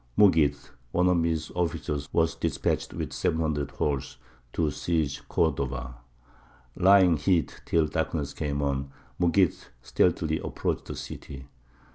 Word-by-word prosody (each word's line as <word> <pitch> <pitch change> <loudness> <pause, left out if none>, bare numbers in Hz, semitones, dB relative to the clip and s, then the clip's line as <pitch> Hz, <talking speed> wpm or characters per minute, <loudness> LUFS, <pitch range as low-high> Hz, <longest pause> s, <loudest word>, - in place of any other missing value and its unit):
Mughīth, 75 -8 +4 0.2
one 90 +5 +3
of 90 -2 +3
his 80 -2 -1
officers, 75 -4 -2
was 80 0 +2
despatched - - -1
with - - -5
seven 80 - 0
hundred 75 -3 -1
horse 70 -3 -2 0.4
to 80 -3 +1
seize 75 -1 -1
Cordova. 65 -2 -1 0.8
Lying 95 -3 +6
hid 85 0 +1
till 80 -2 +3
darkness 75 -2 -2
came 70 -2 -2
on, 70 -1 -1 0.3
Mughīth 90 +1 +2 0.2
stealthily 65 -1 +1
approached - - -3
the - - -6
city. 65 0 -8
75 Hz, 125 wpm, -27 LUFS, 70-85 Hz, 0.8 s, Lying